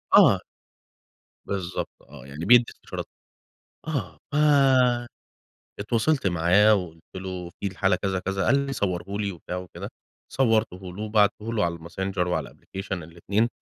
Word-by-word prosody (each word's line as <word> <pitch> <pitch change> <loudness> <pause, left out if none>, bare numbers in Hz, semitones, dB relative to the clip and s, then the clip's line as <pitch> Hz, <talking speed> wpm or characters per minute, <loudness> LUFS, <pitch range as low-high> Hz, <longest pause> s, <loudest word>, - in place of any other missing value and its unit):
آه. - - +7 1.1
بالضبط 95 -2 -3
آه، 70 -1 -13
يعني 75 +4 -6
بيدّي 120 +3 +7
استشارات. - - -7 1.3
آه، 135 -5 +4 0.7
فاتواصلت 115 +5 +1
معاه، 90 +5 +5
وقُلت 85 -4 -4
له 90 -2 -5
في - - -2
الحالة 95 -1 +1
كذا، 95 0 -1
كذا 95 0 -2
قال 140 - +5
لي: 135 - -3
"صوَّرُه 90 -8 -1
لي." 100 -2 -1
وبتاع 90 +1 -6
وكده، 90 0 -7 0.4
صوَّرتُه 110 -7 +2
له، 100 - -6
وبعتته 105 +1 +1
له، 110 -4 +1
على 85 0 -1
الماسنجر 90 +2 -3
وعلى 90 - 0
الأبلكيشن، 95 -2 -6
الاتنين، 90 +8 -1
95 Hz, 130 wpm, -25 LUFS, 90-110 Hz, 1.3 s, آه